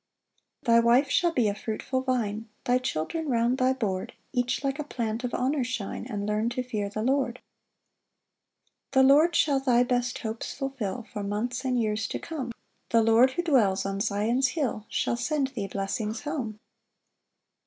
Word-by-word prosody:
3 235 Hz, -, +4 dB
[Thy 230 Hz, -, +7 dB
wife 240 Hz, +4 st, +4 dB
shall 345 Hz, -1 st, +3 dB
be 245 Hz, -8 st, +2 dB
a 205 Hz, -, +1 dB
fruitful 220 Hz, +5 st, -3 dB
vine; 225 Hz, -4 st, -1 dB, 0.2 s
Thy 250 Hz, +1 st, +3 dB
children 260 Hz, -, -2 dB
round 240 Hz, +1 st, +2 dB
thy 255 Hz, 0 st, +4 dB
board, 205 Hz, -8 st, -2 dB, 0.2 s
Each 245 Hz, +1 st, 0 dB
like 275 Hz, +2 st, -1 dB
a -, -, -1 dB
plant 235 Hz, -4 st, -3 dB
of 250 Hz, -, -2 dB
honour 265 Hz, +2 st, +1 dB
shine, 235 Hz, -2 st, -4 dB
And 205 Hz, -3 st, -3 dB
learn 210 Hz, +2 st, 0 dB
to 250 Hz, +1 st, -2 dB
fear 215 Hz, -5 st, -3 dB
the 215 Hz, +2 st, -3 dB
Lord.] 260 Hz, -1 st, +1 dB, 1.5 s
4 265 Hz, -1 st, +6 dB
The -, -, +6 dB
Lord 310 Hz, +5 st, +5 dB
shall 280 Hz, -3 st, +3 dB
thy 250 Hz, -2 st, +3 dB
best 245 Hz, -1 st, 0 dB
hopes 225 Hz, -1 st, -4 dB
fulfil 250 Hz, -5 st, -4 dB
For 210 Hz, -, -3 dB
months 220 Hz, +6 st, -2 dB
and 255 Hz, -2 st, +1 dB
years 215 Hz, -1 st, 0 dB
to -, -, -3 dB
come; 285 Hz, -7 st, -5 dB, 0.4 s
The 230 Hz, -1 st, +4 dB
Lord 230 Hz, +4 st, +5 dB
who 345 Hz, -, -1 dB
dwells 220 Hz, -, +3 dB
on 195 Hz, 0 st, -2 dB
Zion's 225 Hz, +5 st, +1 dB
hill, 250 Hz, -7 st, -2 dB
Shall 235 Hz, -, 0 dB
send 275 Hz, +2 st, 0 dB
thee 220 Hz, -7 st, -4 dB
blessings 210 Hz, +3 st, -3 dB
home. 270 Hz, -8 st, -4 dB
245 Hz, 175 wpm, -27 LUFS, 215-265 Hz, 1.5 s, Thy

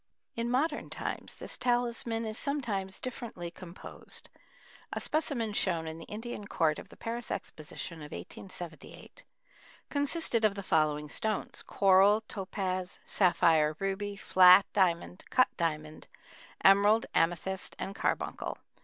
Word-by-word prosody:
In 230 Hz, +1 st, -1 dB
modern 295 Hz, +5 st, 0 dB
times -, -, -5 dB
this -, -, -9 dB
talisman 235 Hz, -2 st, 0 dB
is 215 Hz, -1 st, -4 dB
sometimes 220 Hz, -11 st, -2 dB
differently 225 Hz, -9 st, -6 dB
composed. 175 Hz, 0 st, -10 dB, 0.6 s
A -, -, -2 dB
specimen 265 Hz, -8 st, 0 dB
shown 170 Hz, -5 st, 0 dB
in 160 Hz, +1 st, -6 dB
the 165 Hz, -, -9 dB
Indian 210 Hz, -1 st, -6 dB
Court 155 Hz, -5 st, +1 dB
of -, -, -11 dB
the -, -, -15 dB
Paris 235 Hz, +1 st, -5 dB
Exposition 160 Hz, +2 st, -6 dB
of 150 Hz, -1 st, -9 dB
1878 175 Hz, -, -9 dB, 0.7 s
consisted 285 Hz, -4 st, +1 dB
of 210 Hz, -2 st, +3 dB
the 200 Hz, -, -5 dB
following 150 Hz, -3 st, +1 dB
stones: 215 Hz, +6 st, -2 dB
coral, 195 Hz, +2 st, +5 dB
topaz, 185 Hz, -3 st, -4 dB
sapphire, 160 Hz, -5 st, +4 dB
ruby, 195 Hz, +2 st, -2 dB
flat 185 Hz, 0 st, +7 dB
diamond, 180 Hz, -1 st, +1 dB
cut 255 Hz, -, +4 dB
diamond, 155 Hz, -2 st, -3 dB, 0.6 s
emerald, 205 Hz, +3 st, +6 dB
amethyst, 175 Hz, +3 st, 0 dB
and 195 Hz, -, -4 dB
carbuncle. -, -, -2 dB
195 Hz, 125 wpm, -31 LUFS, 170-230 Hz, 0.7 s, flat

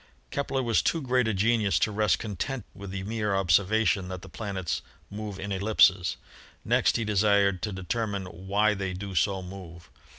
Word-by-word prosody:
Kepler 135 Hz, -2 st, -1 dB
was 115 Hz, -2 st, +2 dB
too 165 Hz, -, +1 dB
great 125 Hz, -4 st, +1 dB
a 110 Hz, -, +1 dB
genius 105 Hz, 0 st, +2 dB
to 105 Hz, -, +1 dB
rest 105 Hz, 0 st, +2 dB
content 115 Hz, +3 st, -4 dB
with 100 Hz, 0 st, -9 dB
the 95 Hz, 0 st, -4 dB
mere 105 Hz, -1 st, -1 dB
observation 95 Hz, +2 st, +2 dB
that 95 Hz, 0 st, -7 dB
the -, -, -10 dB
planets 95 Hz, -5 st, -3 dB, 0.3 s
move 105 Hz, -2 st, -6 dB
in 100 Hz, +1 st, -5 dB
ellipses. 95 Hz, -2 st, +3 dB, 0.5 s
Next -, -, +3 dB
he 115 Hz, -, -2 dB
desired 100 Hz, -2 st, +3 dB
to 105 Hz, -1 st, -2 dB
determine 100 Hz, +2 st, -3 dB
why 100 Hz, +4 st, 0 dB
they 95 Hz, -2 st, -3 dB
do 95 Hz, +1 st, -6 dB
so 95 Hz, +2 st, +1 dB
move. 90 Hz, -2 st, -10 dB
100 Hz, 170 wpm, -27 LUFS, 95-110 Hz, 0.5 s, ellipses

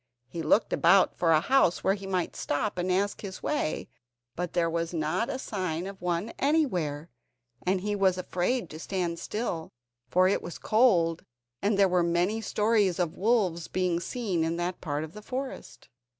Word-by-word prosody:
He 170 Hz, -, -5 dB
looked 165 Hz, +8 st, +2 dB
about 180 Hz, +3 st, +4 dB
for 165 Hz, -2 st, +2 dB
a 155 Hz, -, +6 dB
house 260 Hz, -6 st, +3 dB
where 190 Hz, -, +3 dB
he 195 Hz, -1 st, -6 dB
might 185 Hz, -2 st, -1 dB
stop 180 Hz, +7 st, -2 dB
and 180 Hz, +1 st, 0 dB
ask 200 Hz, +2 st, 0 dB
his 190 Hz, -3 st, -7 dB
way, 295 Hz, -, -1 dB, 0.5 s
but 175 Hz, -1 st, -3 dB
there 170 Hz, -1 st, +2 dB
was 170 Hz, +1 st, -2 dB
not 165 Hz, +8 st, 0 dB
a -, -, -2 dB
sign 185 Hz, -8 st, -3 dB
of 195 Hz, -1 st, -8 dB
one 180 Hz, +5 st, -2 dB
anywhere, 180 Hz, -, 0 dB, 0.6 s
and 185 Hz, 0 st, +2 dB
he 205 Hz, +1 st, -1 dB
was 190 Hz, -2 st, +2 dB
afraid 185 Hz, +5 st, -1 dB
to 155 Hz, -, -8 dB
stand 175 Hz, -2 st, -2 dB
still, 185 Hz, -7 st, -3 dB, 0.4 s
for 185 Hz, +1 st, +4 dB
it 195 Hz, -, +1 dB
was 175 Hz, -, -7 dB
cold, 180 Hz, -8 st, +3 dB, 0.4 s
and 205 Hz, 0 st, +1 dB
there 200 Hz, -1 st, +5 dB
were 180 Hz, -1 st, +2 dB
many 175 Hz, +6 st, +1 dB
stories 210 Hz, -3 st, +2 dB
of 175 Hz, -2 st, -1 dB
wolves 190 Hz, -6 st, +1 dB
being 180 Hz, -2 st, 0 dB
seen 190 Hz, -4 st, -2 dB
in 165 Hz, +1 st, -1 dB
that 175 Hz, +1 st, -3 dB
part 150 Hz, -2 st, -2 dB
of 160 Hz, +1 st, -8 dB
the 210 Hz, -, -9 dB
forest. 260 Hz, +4 st, -6 dB
180 Hz, 180 wpm, -28 LUFS, 170-205 Hz, 0.6 s, a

